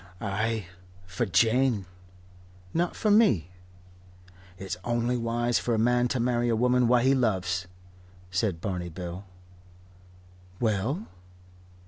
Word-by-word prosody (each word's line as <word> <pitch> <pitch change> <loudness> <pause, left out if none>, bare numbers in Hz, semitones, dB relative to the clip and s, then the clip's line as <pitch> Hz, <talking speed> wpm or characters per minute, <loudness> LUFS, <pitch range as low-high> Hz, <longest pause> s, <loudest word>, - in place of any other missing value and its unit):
"Ay 110 +1 -2 0.4
for 95 +6 -2
Jane." 115 +3 +2 0.9
"Not 175 +1 0
for 215 - +1
me?" 115 - +4 1.1
"It's 95 +1 -5
only 120 +1 0
wise 120 0 0
for 120 - 0
a - - 0
man 120 +2 +3
to 125 0 -2
marry 120 0 +1
a 115 - +2
woman 125 +1 +3
what 120 0 +4
he 135 - +5
loves," 95 -8 0 0.6
said 90 -2 -1
Barney 90 -3 -3
Bill. 90 +3 -7 1.3
"Well?" 115 - -1
115 Hz, 115 wpm, -27 LUFS, 95-125 Hz, 1.3 s, he